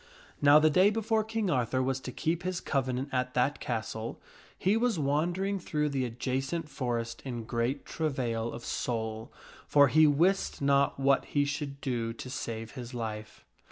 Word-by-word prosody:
/Now 145 +1 +8
the 155 0 +4
day 185 +5 +5
before 220 0 +1
King 220 -3 -1
Arthur 130 -2 +1
was 130 0 0
to 130 - -7
keep 165 +5 -1
his 185 -1 -2
covenant 130 -2 -1
at 125 -1 -1
that 130 +4 +1
castle, 110 -1 -4 0.4
he 195 +3 +2
was 230 -3 +1
wandering 175 +7 0
through 150 -3 -1
the 135 -2 -1
adjacent 135 +7 -2
forest 120 -5 -3
in 120 -4 -4
great 120 +5 -2
travail 120 -7 -2
of 120 - -8
soul, 110 -2 -3 0.4
for 140 -2 +6
he 155 +3 +6
wist 170 +7 +2
not 140 0 +2
what 135 0 +3
he 145 -1 +1
should 140 -1 -4
do 115 -4 -2
to 125 +2 -8
save 115 -2 -5
his 125 -1 -8
life. 110 -2 -6
135 Hz, 165 wpm, -30 LUFS, 120-155 Hz, 0.4 s, Now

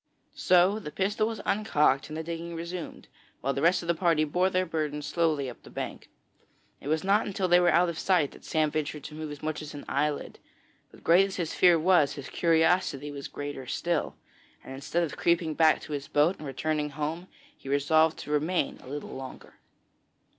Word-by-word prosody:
So 185 +3 +3
the 175 - -7
pistol 200 +6 0
was 225 -1 -5
uncocked 150 -10 +2
and 155 - -6
the 160 - -3
digging 170 +1 -5
resumed, 170 +1 -6 0.3
while 135 +2 0
the 135 - -3
rest 175 +3 +3
of - - -8
the 170 - +3
party 165 -2 +2
bore 180 +5 +1
their 185 0 +1
burden 150 -3 -3
slowly 155 -3 0
up 125 - -9
the - - -14
bank. - - -6 0.7
It - - -10
was 155 +1 0
not 200 +3 +2
until 195 -2 -1
they 175 0 +6
were 175 -1 +4
out 175 +2 +4
of 170 -2 -4
sight 175 -7 +2
that - - -15
Sam 155 -2 0
ventured 150 -1 -3
to - - -8
move 155 0 -6
as 145 0 -9
much 155 0 -3
as 150 -1 -8
an 145 - -8
eyelid; 145 +1 -2 0.5
but - - -18
great 180 +4 +5
as 195 - -7
his 170 -4 -3
fear 175 -2 +5
was, 165 -3 +3
his 140 -2 -8
curiosity 160 -3 +2
was 140 -1 -6
greater 145 -2 -6
still, 170 +3 -1 0.5
and 135 - -9
instead 140 +6 -1
of 160 - -4
creeping 170 -2 +1
back 160 0 +4
to 150 - -7
his 145 0 -4
boat 155 +6 +2
and 150 - -7
returning 150 +2 -2
home, 155 +5 -4 0.3
he 135 - -11
resolved 155 +3 +3
to 150 - -7
remain 155 +2 0
a - - -15
little 145 +1 -6
longer. 130 0 -10
160 Hz, 205 wpm, -28 LUFS, 145-175 Hz, 0.7 s, they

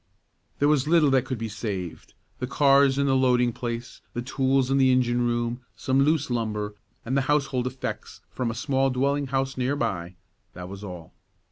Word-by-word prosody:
There 145 - +2
was 150 -2 +2
little 155 -3 +4
that 130 -1 +3
could 130 -2 -3
be 115 0 -3
saved; 100 -6 -6 0.2
the 125 - -2
cars 140 0 +4
in 140 - +2
the 135 -1 +2
loading 125 -2 +3
place, 120 0 -5
the 120 - -2
tools 135 0 +1
in 135 - +3
the 130 -1 +5
engine 125 -1 +2
room, 120 +1 -1
some 135 0 +1
loose 145 -2 +2
lumber, 105 -3 -2 0.3
and 130 +3 -1
the 140 - +3
household 135 -4 +1
effects 130 +1 -6
from 125 -2 -2
a 115 - -4
small 135 +2 +1
dwelling 140 +2 0
house 135 0 -1
near 130 +3 0
by; 95 -9 -3 0.4
that 90 0 -8
was 100 +1 -8
all. 90 -5 -9
130 Hz, 190 wpm, -25 LUFS, 115-135 Hz, 0.4 s, the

